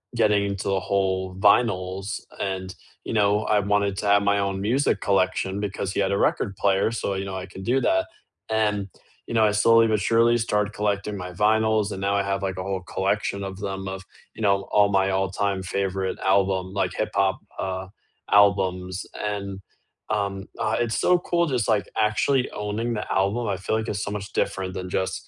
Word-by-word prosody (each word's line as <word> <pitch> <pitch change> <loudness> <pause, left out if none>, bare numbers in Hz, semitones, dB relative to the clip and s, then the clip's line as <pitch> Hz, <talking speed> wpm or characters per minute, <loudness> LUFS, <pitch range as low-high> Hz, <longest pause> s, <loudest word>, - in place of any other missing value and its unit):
getting 105 -3 +3
into 100 -1 -3
the 95 -1 +2
whole 95 -1 -1
vinyls 100 0 +2 0.2
and, 95 -1 -3 0.3
you - - -4
know, 105 -1 +3
I 105 - +3
wanted 100 -1 +1
to - - -3
have 100 0 +5
my 100 0 +2
own 100 -1 -1
music 125 +8 +1
collection 95 0 +1
because 100 -1 -3
he - - -2
had 95 0 +1
a 100 - +1
record 100 - 0
player, 100 +2 +2
so, 110 -3 -2
you 95 - -2
know, 95 -1 -5
I 95 - -5
can 95 +1 -10
do 125 +6 +2
that, 330 0 +2 0.4
and, 105 -2 0 0.4
you - - -5
know, 110 -1 +4
I 105 - +3
slowly 115 +2 +5
but 110 -1 +1
surely 115 +3 +3
started 105 -2 0
collecting 105 0 -1
my 90 -1 -6
vinyls, 110 +2 +2
and 95 - -5
now 100 0 +1
I 100 - +2
have, 100 0 -2
like, 95 -1 -2
a 90 - -3
whole 95 -1 -3
collection 100 +2 -1
of 95 -1 -6
them, 95 -1 -4
of, 95 0 -5 0.3
you - - -9
know, 100 -2 +2
all 105 -1 +5
my 95 -1 +2
all-time 95 0 -1
favorite 95 0 -2
album, 95 -1 +1
like, 100 - 0
hip-hop, 95 0 0 0.2
uh, 95 0 -3 0.4
albums, 95 -2 +3 0.2
and, 100 -2 -4 0.5
um, 100 -2 -2
I 110 +1 0
it's 115 -2 0
so 180 - +4
cool 170 -1 +1
just, 125 -7 0
like, 105 -2 +2
actually 110 +5 +2
owning 105 +3 -3
the 105 - -4
album, 100 +5 +1
I 100 - 0
feel 100 +3 -1
like 110 0 -3
it's 100 -2 -2
so 100 - -4
much 100 -1 -6
different 95 -1 -1
than 90 0 -5
just, 95 +1 -2
100 Hz, 195 wpm, -24 LUFS, 95-105 Hz, 0.5 s, have